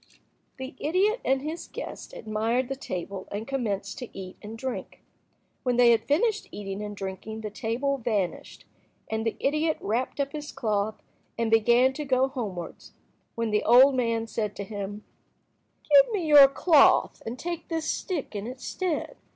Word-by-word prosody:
The 260 0 -6
idiot 390 +9 +1
and 265 +1 +1
his 315 +3 -5
guest - - -7
admired 225 +4 -1
the 270 - -2
table 190 -5 -6
and 210 +3 -4
commenced 235 -8 -2
to 250 - -7
eat 185 -1 -7
and 220 +2 -8
drink. 260 +2 -6 0.6
When 250 -2 0
they 240 -1 +7
had 225 -1 +2
finished 420 +9 +1
eating 195 0 -5
and 205 -1 -6
drinking 195 +3 -6
the 215 -1 -5
table 250 +6 -1
vanished, 210 -6 -3 0.5
and 220 0 -1
the 225 - -1
idiot 305 +3 +1
wrapped 240 +7 -2
up 280 0 0
his 295 -1 -6
cloth 215 -1 -2 0.3
and 230 -1 0
began 240 +4 +5
to 300 - -4
go 265 -1 +2
homewards, 200 - -6 0.4
when 230 -1 -1
the 210 - +2
old 255 +4 +7
man 230 -3 0
said 210 -2 -3
to 200 - -5
him— 205 0 -6 0.8
"Give 285 +5 +6
me 390 -6 -1
your 290 -3 +9
cloth, 285 +2 +4
and 230 +3 -5
take 340 +3 -5
this 325 -2 -2
stick 320 - -3
in 205 +2 -4
its 255 +1 -8
stead. 365 -5 -2
240 Hz, 165 wpm, -27 LUFS, 215-280 Hz, 0.8 s, your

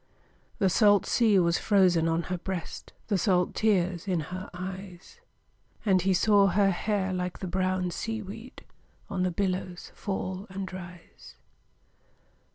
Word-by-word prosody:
The 195 - +2
salt 205 +1 +4
sea 220 -4 +3
was 170 -1 +3
frozen 180 -5 +3
on 165 +1 0
her 180 +1 -3
breast, 185 -2 -6
The 200 -4 0
salt 180 -2 +2
tears 185 -4 +1
in 180 -3 +1
her 185 +2 -6
eyes; 185 - -8 0.6
And 190 -3 +4
he 190 +2 +1
saw 200 +2 +4
her 195 +1 +3
hair 195 0 -1
like 180 -1 -3
the - - -6
brown 185 0 -1
sea 225 +4 -4
weed 225 +6 -10 0.5
On 190 -2 -1
the 185 - +2
billows 185 -1 -3
fall 190 -1 -4
and 190 -1 -6
rise. 180 -1 -11
185 Hz, 145 wpm, -28 LUFS, 180-200 Hz, 0.6 s, salt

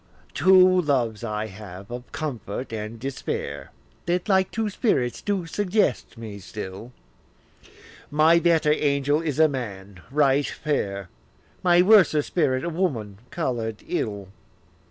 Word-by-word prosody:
II. - - -28
Two 185 +4 +6
loves 120 -8 0
I 105 -1 -2
have, 100 -1 -10
of 120 +1 -8
comfort 125 -5 -5
and 110 +1 -5
despair, 135 +2 -4 0.4
That 175 +3 0
like 190 -2 +3
two 220 -1 -2
spirits 130 - 0
do 200 -4 -1
suggest 190 - 0
me 110 -3 -8
still; 100 +4 -8 1.2
My 155 +3 +5
better 165 -3 +3
angel 145 0 +1
is 150 -4 -3
a 160 0 +6
man 100 - -6
right 140 0 +2
fair, 100 - -3 0.5
My 175 -1 +5
worser 185 -7 +5
spirit 140 -7 0
a - - -1
woman 125 - -2
colour'd 115 -9 -3
ill. 100 -3 -3
140 Hz, 130 wpm, -24 LUFS, 110-170 Hz, 1.2 s, Two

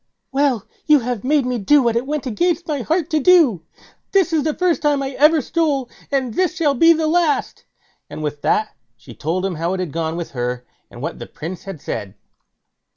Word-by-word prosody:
"Well, 270 -6 +1 0.2
you 300 -3 +6
have 240 -2 -3
made 285 0 +2
me 250 -1 -1
do 280 +7 +4
what 235 -1 +1
it 240 +3 -1
went 300 -1 -2
against 340 +7 0
my 295 -4 -2
heart 325 +5 -1
to 310 - +2
do. 300 - +5 0.5
This 375 -4 +3
is 315 - +3
the 310 -1 -1
first 360 -2 +1
time 290 -2 +1
I 270 - -3
ever 300 +3 +4
stole, 285 -6 -1 0.2
and 260 -4 0
this 365 +3 0
shall 310 -4 +2
be 330 +6 +5
the 320 -1 +2
last"; 315 -2 0 0.4
and 155 - -7
with 145 -1 -4
that 215 0 0 0.2
she 120 0 -13
told 170 - -2
him 195 - -1
how 170 +3 -2
it - - -5
had 180 -5 -3
gone 165 0 -2
with 170 - -5
her, 125 0 -3 0.2
and 120 - -10
what 165 - -4
the - - -7
Prince 170 +3 -8
had 195 -5 -7
said. 100 0 -5
265 Hz, 215 wpm, -20 LUFS, -, 0.5 s, you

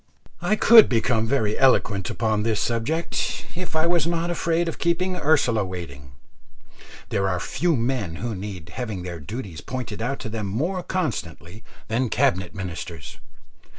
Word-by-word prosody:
I 215 - +2
could 225 0 +8
become 115 -1 +1
very 110 -5 +1
eloquent 105 -7 +3
upon 110 -2 0
this 110 0 0
subject, 125 +9 -1
if 180 -2 -6
I 160 +1 +3
was 170 -2 +3
not 170 0 0
afraid 170 0 0
of 165 - -4
keeping 185 +2 +1
Ursula 125 - +2
waiting. 70 -8 -7 1.0
There 95 -1 +1
are 90 -1 0
few 170 - 0
men 115 -8 -1
who 115 +6 -3
need 95 -4 -7
having 105 -3 -5
their 85 -2 -6
duties 95 - -6
pointed 120 -4 -5
out 135 +4 -1
to - - -5
them 110 -2 -3
more 165 - -1
constantly 110 - -4 0.2
than 120 +2 0
Cabinet 105 -9 +1
Ministers. 85 -4 -6
115 Hz, 150 wpm, -24 LUFS, 95-160 Hz, 1.0 s, could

